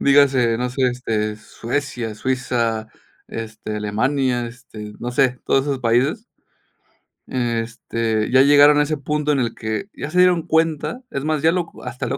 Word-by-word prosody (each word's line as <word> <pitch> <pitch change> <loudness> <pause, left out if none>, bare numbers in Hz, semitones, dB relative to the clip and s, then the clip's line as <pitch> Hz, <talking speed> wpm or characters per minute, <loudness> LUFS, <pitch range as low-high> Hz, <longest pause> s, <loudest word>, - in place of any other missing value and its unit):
dígase, 135 -4 +4
no 125 +1 -1
sé, 130 +2 -2
este, 110 -4 -2
Suecia, 120 +1 -4
Suiza, 115 -2 -1 0.4
este, 110 -1 -6
Alemania, 120 +4 0
este, 110 -3 -10
no 120 - -4
sé, 125 0 +1
todos 135 - +3
esos 140 -1 -2
países. 130 - +1 1.0
Este, 115 -2 -2
ya 130 +1 +6
llegaron 145 +1 +7
a - - +5
ese 155 0 -2
punto 150 +2 -1
en 140 - +2
el 115 -3 -1
que, 110 - -4
ya - - -6
se 180 +3 0
dieron 180 -2 +5
cuenta, 160 - 0
es 140 - -3
más, 155 -1 0
ya 160 +2 +4
lo 180 -1 0
co - - -15
hasta 125 - -5
lo 135 - -2
125 Hz, 170 wpm, -21 LUFS, 115-145 Hz, 1.0 s, llegaron